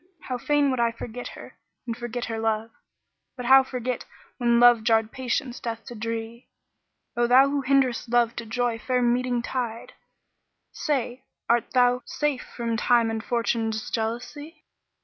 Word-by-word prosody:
How 250 -3 -4
fain 290 +2 +2
would 255 - -2
I 235 -1 +2
forget 235 +1 -7
her - - -12 0.3
and 230 -2 -3
forget 240 0 -4
her 225 -1 -4
love! 220 0 -1 0.3
* - - -54
But 250 - -5
how 265 +2 +8
forget 255 -1 -4 0.4
when 235 -1 +3
Love 240 -2 +6
garred 225 -1 +2
Patience 255 0 -3
death 230 -2 -5
to - - -8
dree? 230 +1 -5 0.7
O 240 0 +2
thou 260 +3 +6
who 285 -1 0
hinderest 260 -3 +1
Love 235 -1 +2
to 235 - -4
'joy 235 0 -1
fair 250 +1 0
meeting 245 0 +1
tide 235 -3 -4 0.5
* - - -53 0.2
Say! 255 -3 -1 0.2
art 235 0 +2
thou 250 0 +4
safe 295 -4 -1
from 230 -1 -4
Time 235 -1 +3
and 225 0 -4
Fortune's 230 -1 -1
jealousy? 250 +8 -4
240 Hz, 165 wpm, -25 LUFS, 230-255 Hz, 0.7 s, how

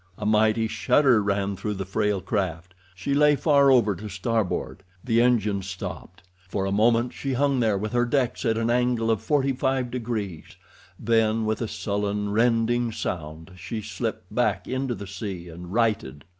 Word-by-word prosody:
A 105 - -5
mighty 110 +1 +3
shudder 130 0 +3
ran 100 -1 -1
through 105 +2 -3
the 95 0 -4
frail 105 0 0
craft; 90 -3 -3 0.2
she 115 +10 -2
lay 150 +1 +5
far 140 0 +4
over 120 -6 +4
to 105 +2 -7
starboard; 100 0 -2 0.2
the 115 -2 +2
engines 105 -6 +1
stopped. 90 -2 -7 0.3
For 95 0 -1
a 95 - -1
moment 115 +4 +2
she 135 -1 -3
hung 140 0 +1
there 110 -4 +2
with 105 +2 -3
her 120 0 +2
decks 125 -1 0
at 115 -3 +1
an 115 +1 +1
angle 120 -2 +1
of 110 -2 0
forty 135 +3 +1
five 130 -1 -1
degrees—then, 110 0 -2
with 110 +2 -1
a 115 - -1
sullen, 105 0 -2
rending 115 +1 +2
sound, 80 -5 -5
she 110 +6 -5
slipped 105 - -5
back - - 0
into 130 -1 -2
the 100 - -8
sea 95 -3 -6
and 85 +2 -9
righted. 105 - 0
110 Hz, 170 wpm, -25 LUFS, 100-120 Hz, 0.3 s, lay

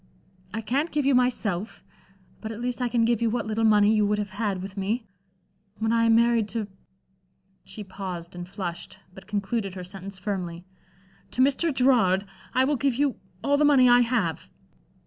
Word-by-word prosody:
I 220 - -3
can't 270 +9 0
give 295 -3 -1
you 275 - +4
myself, 230 -6 0 0.6
but 220 - -5
at 225 - -7
least 245 +1 -3
I 250 - +1
can 230 -1 +2
give 235 -1 +1
you 230 - +2
what 230 -1 -2
little 220 +1 -1
money 210 -1 +5
you 215 -1 +3
would 210 0 +1
have 205 -2 -3
had 200 -1 -2
with 190 +1 -7
me. 210 +4 -2 0.7
When 220 +1 0
I 230 0 +3
am 225 0 +5
married 230 -2 +3
to" 220 -2 -3 1.0
she 215 - -8
paused 185 -3 -7
and 175 0 -7
flushed, 175 -3 -6 0.2
but 190 +1 -13
concluded 200 -1 -2
her 185 - -6
sentence 195 +1 -8
firmly 180 -3 -4 0.6
"to 255 - +2
Mr. 285 +5 +2
Gerard, 235 -8 +3 0.3
I 260 - +4
will 285 +1 +1
give 275 -1 +1
you 275 -1 0 0.3
all 285 0 +3
the 300 - +3
money 280 -4 +6
I 245 0 +7
have." 230 - 0
220 Hz, 185 wpm, -26 LUFS, 195-245 Hz, 1.0 s, I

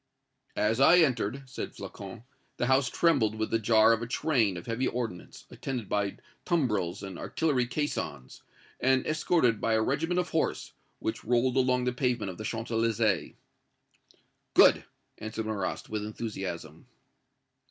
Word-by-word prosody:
"As 110 +3 +1
I 160 +6 +7
entered," 135 - +1
said 130 - -7
Flocon, 100 +3 -9 0.3
"the - - 0
house 130 +1 +3
trembled 135 -11 +2
with 110 0 -3
the 115 - +2
jar 110 +1 +5
of 115 - -1
a 115 - -4
train 120 - +1
of 85 - -8
heavy 120 +3 -1
ordnance, 115 -8 -5
attended 125 -6 -5
by 100 -1 -1 0.3
tumbrels 105 - 0
and 95 -3 -7
artillery 135 -7 0
caissons, 135 - -4 0.4
and 130 0 +2
escorted 155 -7 +2
by 115 - +1
a 110 - +3
regiment 165 +8 0
of 180 - -1
horse, 160 - -1 0.2
which 110 - -4
rolled 120 +2 +2
along 125 -1 +2
the 125 0 0
pavement 125 -6 -1
of 90 - -12
the - - -5
Champs 115 +2 -4
Elysées." 115 -2 +1 1.2
"Good!" - - +6 0.3
answered 110 +1 -4
Marrast, 100 -4 -3
with 105 -1 -3
enthusiasm. 95 -8 -6
115 Hz, 150 wpm, -29 LUFS, 105-130 Hz, 1.2 s, I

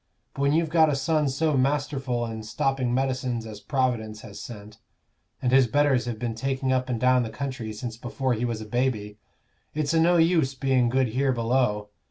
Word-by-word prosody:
But 140 - -5
when 140 +1 +3
you've 160 0 +1
got 160 -2 +5
a 145 - +1
son 150 +1 +1
so 150 +3 +1
masterful 135 -2 0
and 110 -1 -6
stopping 130 +3 -1
medicines 130 -2 -1
as 110 -2 -8
Providence 120 -5 -1
has 105 -2 -10
sent, 105 -1 -10 0.6
and 125 - +2
his 130 -1 +5
betters 140 -1 +2
have 120 -2 -3
been 115 +1 -3
taking 130 +3 -1
up 130 0 0
and 120 -2 -1
down 125 +1 +4
the 115 - -3
country 125 -2 -5
since 115 +1 -6
before 130 +1 -2
he 115 +1 -2
was 115 -2 -2
a - - -6
baby, 105 -3 -2 0.6
it's 155 0 0
o' 165 - +4
no 175 +1 +4
use 165 -5 +3
being 130 -2 +2
good 130 0 +2
here 130 +3 +1
below. 115 -3 0
130 Hz, 200 wpm, -26 LUFS, 115-135 Hz, 0.6 s, got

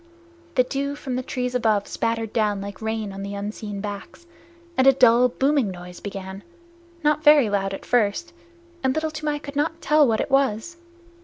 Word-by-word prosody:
The 255 - +5
dew 280 +2 -3
from 265 -3 -5
the 255 - -1
trees 250 0 -3
above 220 -5 +1
spattered 230 -1 -2
down 210 -3 +1
like 200 +1 -7
rain 220 -2 -3
on 195 - -7
the 200 +1 -5
unseen 205 0 -5
backs, 205 - -7 0.5
and 260 -3 +3
a 270 - +8
dull 250 -1 +5
booming 270 -2 +1
noise 180 -1 -9
began, 195 -1 -7 0.6
not 300 +1 +2
very 295 -7 +6
loud 195 -1 0
at 195 - -7
first, 245 +9 +1 0.5
and 265 0 +1
Little 315 0 -1
Toomai 305 -1 -2
could 285 -1 -9
not 320 +3 -1
tell 300 -3 +4
what 225 -2 +1
it - - -2
was. 270 +4 +1
240 Hz, 180 wpm, -23 LUFS, 205-285 Hz, 0.6 s, a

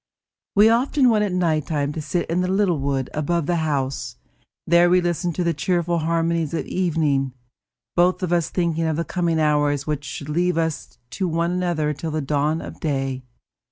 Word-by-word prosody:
We 205 +2 +7
often 250 +3 +3
went 210 -1 +2
at 200 - -2
night 165 -5 0
time 145 -2 -1
to 160 - -4
sit 175 +4 -2
in 170 +2 0
the 180 - 0
little 190 -4 +1
wood 135 -1 -2
above 155 +2 0
the 175 +2 0
house; 140 - -2 0.5
there 170 +1 +5
we 180 +1 +5
listened 175 -1 -1
to 180 - 0
the 170 -1 +1
cheerful 170 +2 0
harmonies 165 0 0
of - - -2
evening, 150 -7 0 0.6
both 180 +2 +3
of 175 -1 0
us 170 -2 +1
thinking 165 -2 0
of 160 -1 0
the 170 - -1
coming 170 -3 0
hours 145 -2 +1
which 150 -2 -2
should 145 0 -7
leave 175 +2 +1
us 160 -2 -2
to 190 - -2
one 170 +1 0
another 175 -4 0
till 160 +3 -5
the 155 0 -2
dawn 150 +2 0
of - - -9
day. 135 -3 -2
165 Hz, 190 wpm, -22 LUFS, 150-175 Hz, 0.6 s, We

